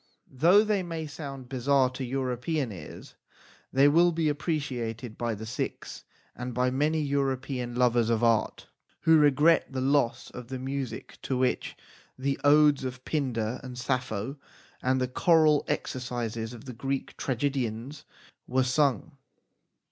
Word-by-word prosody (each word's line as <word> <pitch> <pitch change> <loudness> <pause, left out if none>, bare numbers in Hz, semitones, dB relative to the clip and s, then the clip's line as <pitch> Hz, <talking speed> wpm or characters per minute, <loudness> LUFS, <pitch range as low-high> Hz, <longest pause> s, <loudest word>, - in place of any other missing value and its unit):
Though 170 +10 +5
they 210 -2 +1
may 165 -3 -4
sound 140 -3 -8
bizarre 130 0 +2
to 130 - -5
European 130 +2 -2
ears, 85 -7 -10 0.6
they 135 +2 +5
will 170 +4 +5
be 160 -2 0
appreciated 130 -7 -3
by 120 -2 -2
the 110 +2 -7
Sikhs 115 - -5 0.3
and 125 0 -5
by 125 +1 +2
many 150 +4 +1
European 135 -3 -1
lovers 120 -2 +3
of 115 0 +1
art 115 -2 +1 0.4
who 160 -1 +5
regret 150 +3 +4
the 130 - -3
loss 135 -2 +1
of 125 -1 -9
the 130 +1 -5
music 135 0 -5
to 130 - -2
which 130 0 -1 0.4
the 135 +1 -1
Odes 145 -1 +5
of 130 0 -6
Pindar 125 -6 -1
and 125 -1 -8
Sappho 125 -1 -2 0.4
and 130 +1 +1
the 130 - 0
choral 155 +2 +4
exercises 120 -3 -3
of 120 0 -11
the 130 - -7
Greek 135 +3 -3
tragedians 130 0 -2 0.4
were 130 +1 +2
sung. 130 -2 +1
130 Hz, 140 wpm, -28 LUFS, 125-145 Hz, 0.6 s, Though